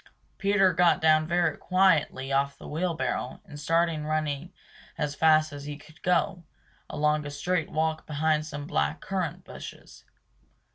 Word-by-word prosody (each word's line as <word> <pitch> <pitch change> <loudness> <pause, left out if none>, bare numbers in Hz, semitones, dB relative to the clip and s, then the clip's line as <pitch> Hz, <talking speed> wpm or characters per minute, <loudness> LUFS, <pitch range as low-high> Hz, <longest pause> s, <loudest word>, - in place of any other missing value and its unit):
Peter 195 -2 +3
got 175 -1 +4
down 155 0 +4
very 170 -2 +1
quietly 165 -8 +2
off 140 +1 +1
the - - -11
wheel 170 +2 -1
barrow 130 -2 -3
and 145 - -10
started 165 +1 +1
running 155 +1 -2 0.5
as 150 -1 -1
fast 155 0 +4
as 145 0 -8
he 145 0 -5
could 155 +1 -18
go, 180 0 +1 0.5
along 150 0 +1
a 145 - -5
straight 165 +3 -1
walk 160 0 -1
behind 155 0 +1
some 145 -2 -6
black 75 - 0
currant 185 -5 -3
bushes. - - -11
155 Hz, 150 wpm, -27 LUFS, 145-170 Hz, 0.5 s, got